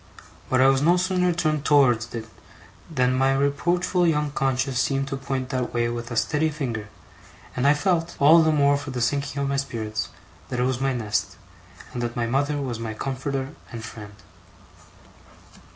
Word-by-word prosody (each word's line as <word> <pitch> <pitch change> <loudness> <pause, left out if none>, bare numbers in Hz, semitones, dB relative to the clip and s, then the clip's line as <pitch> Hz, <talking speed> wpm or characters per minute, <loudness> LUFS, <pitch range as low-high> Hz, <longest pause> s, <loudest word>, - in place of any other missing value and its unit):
But 130 0 +3
I 130 - +6
was 135 0 +3
no 170 +4 +4
sooner 180 0 +1
turned 155 -4 0
towards 125 -6 +3
it, 115 -1 -5 0.6
than 130 -5 +1
my 135 +1 +2
reproachful 175 +6 +1
young 150 -2 +1
conscience 135 -1 0
seemed 135 0 0
to 135 - -2
point 135 -1 -3
that 130 -3 -2
way 120 0 +1
with 120 0 -5
a 120 - -4 0.2
ready 155 +2 +2
finger; 120 -9 -4 0.7
and 125 +2 +1
I 145 - +6
felt, 170 +1 0
all 155 +4 +7
the 160 0 +3
more 145 -1 +3
for 145 0 -7
the 130 -2 -4
sinking 140 +3 -1
of - - 0
my 140 - 0
spirits, 110 -6 -3 0.4
that 125 - -3
it - - +2
was 130 0 0
my 135 0 +1
nest, 105 -5 -2 0.6
and 120 - -3
that 120 0 -3
my 120 - 0
mother 140 +5 0
was 125 -5 -3
my 110 -1 -4
comforter 135 +2 -3 0.2
and 115 -2 -7
friend. 105 -2 -10
135 Hz, 185 wpm, -24 LUFS, 120-145 Hz, 0.7 s, all